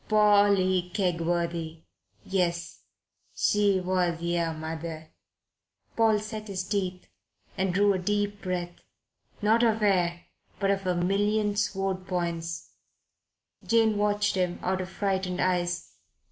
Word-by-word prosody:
"Polly 200 -4 +4
Kegworthy? 170 -3 -1 0.4
Yes. 175 -3 -1 0.5
She 205 -2 +3
was 180 -2 0
yer 170 -1 0
mother." 160 0 -6 0.8
Paul 225 -2 +4
set 215 0 -6
his 190 -2 -3
teeth 185 -2 -2 0.5
and 190 -1 0
drew 200 +2 +3
a 190 - -1
deep 205 +2 -1
breath 175 -2 -4 0.6
not 220 +2 +4
of 225 -2 +2
air, 175 -4 +2 0.4
but 195 -1 +2
of 195 -1 -1
a 180 - +1
million 205 +3 +1
sword 195 -2 -1
points, 170 -2 -3 0.9
Jane 225 -2 +3
watched 205 0 +1
him 180 -2 0
out 185 +1 0
of 185 - -6
frightened 190 -2 -1
eyes. 180 -1 0
185 Hz, 120 wpm, -27 LUFS, 175-205 Hz, 0.9 s, Polly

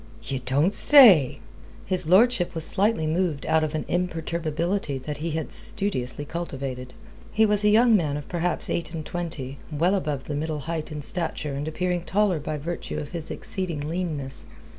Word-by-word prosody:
"Ye 130 +3 -3
don't 140 +9 +1
say!" 200 - +7 0.4
His 180 -3 -2
lordship 195 -1 +4
was 165 -1 -2
slightly 200 -4 +1
moved 160 -2 -1
out 160 0 +2
of 155 0 -2
an 155 - -3
imperturbability 170 -1 -2
that 145 +3 -6
he 165 +3 -3
had 160 0 -4
studiously 145 -9 0
cultivated. 135 -6 -6 0.4
He 220 +1 +3
was 210 -1 +1
a 210 - +5
young 225 +2 +5
man 150 -7 0
of 145 - -8
perhaps 175 0 -2
eight 170 0 -3
and 155 -2 -5
twenty, 150 -6 -5
well 165 +5 +1
above 150 -8 -2
the 150 - -5
middle 155 0 -3
height 160 +1 -4
in 150 -1 -5
stature 160 -3 -1
and 140 +2 -4
appearing 180 +2 -1
taller 195 -3 +1
by 150 +1 -4
virtue 170 +4 -5
of 145 - -6
his 165 -2 -6
exceeding 170 -6 -4
leanness. 155 -7 -4
160 Hz, 175 wpm, -25 LUFS, 145-180 Hz, 0.4 s, say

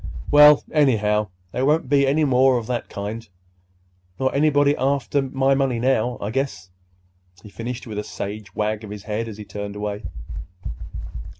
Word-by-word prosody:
Well, 150 0 +8
anyhow, 105 -8 +2 0.2
there 125 - -2
won't 150 +1 +2
be 140 0 +3
any 150 +3 +3
more 130 -1 +4
of 115 - -3
that 120 +1 -3
kind, 105 +3 -6 0.9
nor 130 0 +1
anybody 145 0 +3
after 140 +1 0
my 135 0 +1
money 135 -3 +1
now, 125 -1 +1
I 100 - -3
guess," 105 -8 -3 0.7
he 105 - -11
finished 115 +4 -6
with 105 -3 -5
a - - -3
sage 105 +1 -7
wag 110 +1 -1
of 105 - -8
his 105 -1 -8
head 110 +1 -3
as 110 -2 -8
he 105 - -8
turned 100 0 -6
away. 105 0 -4
120 Hz, 165 wpm, -22 LUFS, 105-135 Hz, 0.9 s, Well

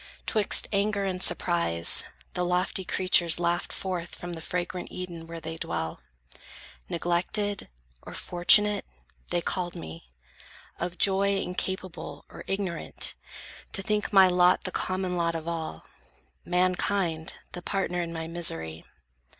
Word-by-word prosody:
'Twixt 215 -2 +5
anger 200 0 +1
and 185 -1 -2
surprise, 85 - +3 0.3
the 180 - -1
lofty 180 +2 0
creatures 175 -2 +3
laughed 175 0 0
Forth 180 -3 -4
from 175 0 -6
the 165 - -6
fragrant 180 +1 -3
Eden 170 -3 -7
where 165 0 -7
they 160 0 -6
dwell; 80 - -3 0.9
Neglected, 185 +4 +1 0.3
or - - -10
unfortunate, 205 +4 +4 0.5
they 175 - +1
called 175 0 -2
me; 80 -6 -9 0.7
Of 175 +1 -3
joy 200 0 +3
incapable, 185 -1 -4
or - - -10
ignorant, 195 -3 -1 0.6
To 195 - +2
think 210 +1 0
my 195 -2 +8
lot 180 0 +4
the 185 - -2
common 185 -1 -1
lot 170 -1 0
of 160 0 -5
all, 165 -2 -4 0.6
Mankind, 180 -2 0 0.2
the 175 - -7
partner 180 -1 -1
in 170 -1 -4
my 165 -1 -4
misery. 80 - -1
180 Hz, 130 wpm, -27 LUFS, 170-190 Hz, 0.9 s, my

